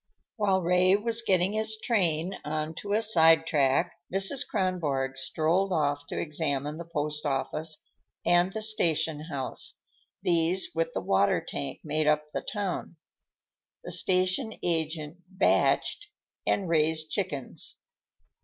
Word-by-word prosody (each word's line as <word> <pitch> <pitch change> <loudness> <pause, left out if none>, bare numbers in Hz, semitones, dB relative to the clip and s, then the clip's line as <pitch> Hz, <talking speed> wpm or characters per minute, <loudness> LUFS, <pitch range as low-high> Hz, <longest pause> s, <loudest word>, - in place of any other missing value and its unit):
While 195 -4 +1
Ray 180 +2 +4
was 225 +2 0
getting 190 -2 +2
his 220 0 -2
train 185 -6 0
on 155 +1 -3
to 200 0 -4
a 220 +2 +2
side 165 -6 +5
track, 145 +3 +2 0.2
Mrs. 195 +8 +4
Kronborg 155 - -1
strolled 165 +8 0
off 145 -3 0
to - - -5
examine 150 -1 -2
the 170 - -7
post 150 -1 -2
office 155 +2 -1 0.4
and 175 +2 +4
station 165 -8 +1
house; 140 -5 -5 0.5
these, 175 - +2
with - - -2
the - - -1
water - - +2
tank, - - -5
made 155 -1 0
up 150 0 +3
the - - -2
town. 195 -4 -4 0.9
The - - -7
station 185 +4 +2
agent 160 -1 -2 0.2
"batched" 410 - +2 0.4
and 195 - +1
raised 155 -1 +1
chickens. 155 -8 -3
170 Hz, 125 wpm, -28 LUFS, 150-190 Hz, 0.9 s, side